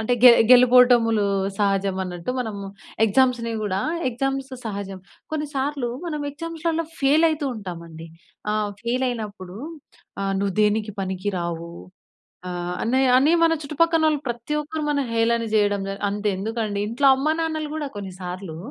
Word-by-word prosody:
అంటే 220 Hz, +3 st, 0 dB
గె 250 Hz, -, +11 dB, 0.2 s
గెలుపోటములు 245 Hz, -3 st, +6 dB, 0.3 s
సహజం 195 Hz, -2 st, +1 dB
అన్నట్టు, 180 Hz, +3 st, -5 dB
మనము 215 Hz, -4 st, -4 dB, 0.4 s
ఎగ్జామ్స్‌ని 235 Hz, +1 st, +2 dB
కూడా 195 Hz, -2 st, -1 dB, 0.3 s
ఎగ్జామ్స్ 270 Hz, +2 st, -2 dB
సహజం. 200 Hz, -3 st, -5 dB, 0.3 s
కొన్నిసార్లు 285 Hz, -4 st, -2 dB, 0.2 s
మనం 305 Hz, -3 st, -3 dB
ఎగ్జామ్స్‌లలో 330 Hz, +2 st, -3 dB
ఫెయిల్ 295 Hz, +4 st, +4 dB
అవుతూ 305 Hz, -2 st, -2 dB
ఉంటామండి. 170 Hz, -5 st, -8 dB, 0.5 s
ఆహ్, 210 Hz, -1 st, 0 dB
ఫెయిల్ 245 Hz, +2 st, 0 dB
అయినప్పుడు, 205 Hz, -5 st, -7 dB, 0.7 s
"ఆహ్, 195 Hz, 0 st, -1 dB
నువ్వు 200 Hz, -2 st, -1 dB
దేనికి 210 Hz, 0 st, +1 dB
పనికి 190 Hz, +1 st, -2 dB
రావు" 170 Hz, -1 st, -4 dB, 0.8 s
ఆహ్, 175 Hz, 0 st, -4 dB
అని 260 Hz, +4 st, +2 dB, 0.2 s
అని 290 Hz, +5 st, +4 dB
మన 330 Hz, 0 st, +5 dB
చుట్టుపక్కనోళ్ళు 315 Hz, 0 st, +2 dB
ప్రతి 240 Hz, +5 st, -3 dB
ఒక్కరు 310 Hz, +1 st, -5 dB
మన 285 Hz, -, +1 dB
హేళన 230 Hz, 0 st, +2 dB
చేయడం, 205 Hz, -1 st, +2 dB, 0.3 s
అంత 205 Hz, +1 st, -4 dB
ఎందుకండి 215 Hz, +1 st, -3 dB
ఇంట్లో 235 Hz, +6 st, 0 dB
అమ్మానాన్నలు 315 Hz, +2 st, -1 dB
కూడా 310 Hz, -2 st, -3 dB
కొన్నిసార్లు, 185 Hz, -3 st, -7 dB
230 Hz, 130 wpm, -23 LUFS, 200-280 Hz, 0.8 s, గె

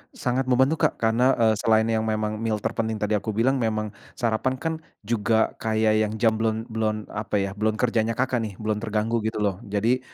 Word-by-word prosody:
Sangat 125 Hz, +1 st, -1 dB
membantu, 130 Hz, +5 st, +3 dB
Kak, -, -, -10 dB
karena, 120 Hz, +4 st, +3 dB
eee, 110 Hz, -2 st, +3 dB
selain 110 Hz, -1 st, +3 dB
yang 110 Hz, -1 st, +2 dB
memang 110 Hz, 0 st, -1 dB
meal 115 Hz, -1 st, 0 dB
terpenting 110 Hz, -1 st, -1 dB
tadi 105 Hz, 0 st, -2 dB
aku 105 Hz, +1 st, -4 dB
bilang, 130 Hz, +4 st, +2 dB
memang 110 Hz, -2 st, -1 dB, 0.2 s
sarapan 120 Hz, +2 st, 0 dB
kan 160 Hz, +5 st, -2 dB, 0.3 s
juga 110 Hz, 0 st, +1 dB
kayak 110 Hz, -1 st, +2 dB
yang 105 Hz, -, -5 dB
jam 110 Hz, 0 st, +3 dB
belum 110 Hz, 0 st, 0 dB
belum 110 Hz, -1 st, 0 dB, 0.2 s
apa 105 Hz, 0 st, -3 dB
ya, 100 Hz, -1 st, 0 dB
belum 105 Hz, +2 st, 0 dB
kerjanya, 115 Hz, -1 st, +1 dB
Kakak, 130 Hz, +1 st, 0 dB
nih, 110 Hz, -3 st, -4 dB
belum 110 Hz, 0 st, -2 dB
terganggu 110 Hz, +1 st, -1 dB
gitu 105 Hz, -1 st, -2 dB
loh. 100 Hz, -2 st, 0 dB
Jadi 110 Hz, +5 st, +1 dB
110 Hz, 195 wpm, -25 LUFS, 110-115 Hz, 0.3 s, membantu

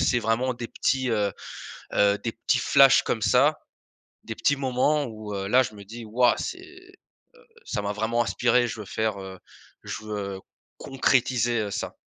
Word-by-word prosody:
c'est 120 Hz, -, +2 dB
vraiment 115 Hz, +3 st, 0 dB
des 120 Hz, -1 st, -6 dB
petits, 130 Hz, -2 st, 0 dB
heu 105 Hz, -3 st, 0 dB, 0.6 s
heu, 100 Hz, 0 st, +4 dB
des 115 Hz, -, 0 dB
petits 115 Hz, +2 st, 0 dB
flashs 135 Hz, +2 st, +6 dB
comme 115 Hz, -, -2 dB
ça, 135 Hz, +7 st, +3 dB, 0.7 s
des -, -, -5 dB
petits 145 Hz, -, +1 dB
moments 135 Hz, +3 st, +1 dB
où, 110 Hz, -2 st, -8 dB
heu, 95 Hz, 0 st, -3 dB
là 130 Hz, +4 st, +5 dB
je 110 Hz, -3 st, -6 dB
me 100 Hz, -, -11 dB
dis: 115 Hz, +3 st, -9 dB
«Ouah! 120 Hz, +3 st, +3 dB
C'est 365 Hz, -, -4 dB
heu, 370 Hz, 0 st, -15 dB, 0.7 s
ça -, -, -3 dB
m'a 100 Hz, 0 st, -2 dB
vraiment 115 Hz, +3 st, 0 dB
inspiré 120 Hz, +1 st, +2 dB
je 115 Hz, -, -6 dB
veux 105 Hz, -, -7 dB
faire, 110 Hz, +1 st, -2 dB
heu, 95 Hz, -1 st, -9 dB, 0.5 s
je -, -, -6 dB
veux, 100 Hz, -2 st, -4 dB
heu, -, -, -10 dB, 0.4 s
concrétiser, 125 Hz, -3 st, +1 dB
heu, 105 Hz, -1 st, -2 dB
ça». -, -, -4 dB
115 Hz, 185 wpm, -25 LUFS, 105-130 Hz, 0.7 s, flashs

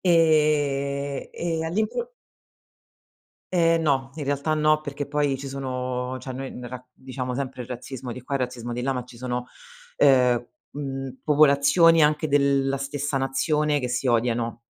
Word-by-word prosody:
Ehm 145 Hz, -4 st, +2 dB
e 165 Hz, -2 st, -2 dB
all'impro 215 Hz, -, -2 dB, 1.4 s
Ehm, 165 Hz, -2 st, +3 dB
no, 135 Hz, -3 st, +1 dB
in 150 Hz, -2 st, -5 dB
realtà 145 Hz, +2 st, 0 dB
no. 155 Hz, 0 st, +3 dB
Perché 145 Hz, -1 st, -5 dB
poi, 145 Hz, -1 st, 0 dB
ci 135 Hz, +1 st, -7 dB
sono 130 Hz, -1 st, -3 dB
cioè 130 Hz, -, -6 dB
noi 135 Hz, +1 st, -5 dB
n 125 Hz, -, -8 dB
ra 125 Hz, -, -5 dB
noi, 125 Hz, -, -17 dB
diciamo 130 Hz, -1 st, -5 dB
sempre 130 Hz, -1 st, -4 dB
il 120 Hz, -, -11 dB
razzismo 125 Hz, 0 st, -6 dB
di 125 Hz, -, -9 dB
qua 140 Hz, +2 st, -2 dB
e -, -, -2 dB
razzismo 125 Hz, -2 st, -4 dB
di 120 Hz, -, -3 dB
là. 135 Hz, +2 st, 0 dB
Ma 125 Hz, -1 st, -3 dB
ci 125 Hz, -1 st, -15 dB
sono, 125 Hz, 0 st, -3 dB, 0.5 s
ehm, 125 Hz, -3 st, +4 dB, 0.2 s
mhmm, 135 Hz, -2 st, -5 dB
popolazioni, 150 Hz, +3 st, +5 dB
anche 150 Hz, +1 st, +2 dB
della 140 Hz, -1 st, +2 dB
stessa 140 Hz, +1 st, -2 dB
nazione, 150 Hz, +2 st, +1 dB
che 125 Hz, -, -2 dB
si 125 Hz, +2 st, -1 dB
odiano. 120 Hz, -1 st, 0 dB
135 Hz, 165 wpm, -25 LUFS, 125-150 Hz, 1.4 s, popolazioni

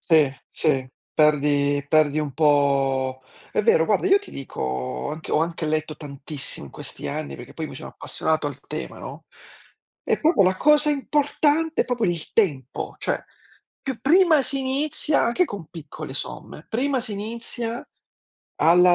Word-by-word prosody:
Sì, 155 Hz, -5 st, +4 dB, 0.2 s
sì. 135 Hz, -5 st, 0 dB, 0.2 s
Perdi 145 Hz, -1 st, +3 dB
perdi 155 Hz, -1 st, +3 dB
un 145 Hz, -3 st, -3 dB
po' 135 Hz, -3 st, +2 dB, 0.3 s
è -, -, +1 dB
vero 165 Hz, -7 st, +5 dB
guarda, 215 Hz, -, +2 dB
io 395 Hz, +1 st, +5 dB
ti 410 Hz, -, -12 dB
dico 135 Hz, -, -8 dB
ho 65 Hz, -1 st, -2 dB
anche 155 Hz, +1 st, -6 dB
ho -, -, +4 dB
anche 165 Hz, -1 st, -1 dB
letto 155 Hz, 0 st, -1 dB
tantissimo 140 Hz, -, -7 dB
in -, -, -13 dB
questi -, -, -6 dB
anni, 70 Hz, -1 st, -4 dB
perché -, -, -10 dB
poi -, -, -4 dB
mi -, -, -9 dB
sono -, -, -8 dB
appassionato 155 Hz, -1 st, -1 dB
al 140 Hz, -1 st, -6 dB
tema, 155 Hz, +2 st, -6 dB
no, -, -, -8 dB, 0.8 s
e -, -, +1 dB
proprio 320 Hz, -, +4 dB
la 185 Hz, 0 st, +3 dB
cosa 300 Hz, +3 st, +4 dB
importante 295 Hz, +2 st, +1 dB
è -, -, -14 dB
proprio 245 Hz, -3 st, -1 dB
il 170 Hz, -3 st, -1 dB
tempo. 145 Hz, -, 0 dB
Cioè, -, -, -1 dB, 0.6 s
più 265 Hz, -5 st, -4 dB
prima 320 Hz, +1 st, +5 dB
si 275 Hz, +1 st, -3 dB
inizia 285 Hz, +3 st, +1 dB
anche 240 Hz, +11 st, +3 dB
con 200 Hz, -, -7 dB
piccole 155 Hz, -3 st, -8 dB
somme, 150 Hz, +2 st, -6 dB
prima 260 Hz, +3 st, 0 dB
si 235 Hz, -1 st, -7 dB
inizia, 230 Hz, +3 st, -4 dB, 0.8 s
alla 175 Hz, +2 st, +6 dB
160 Hz, 160 wpm, -24 LUFS, -, 0.8 s, alla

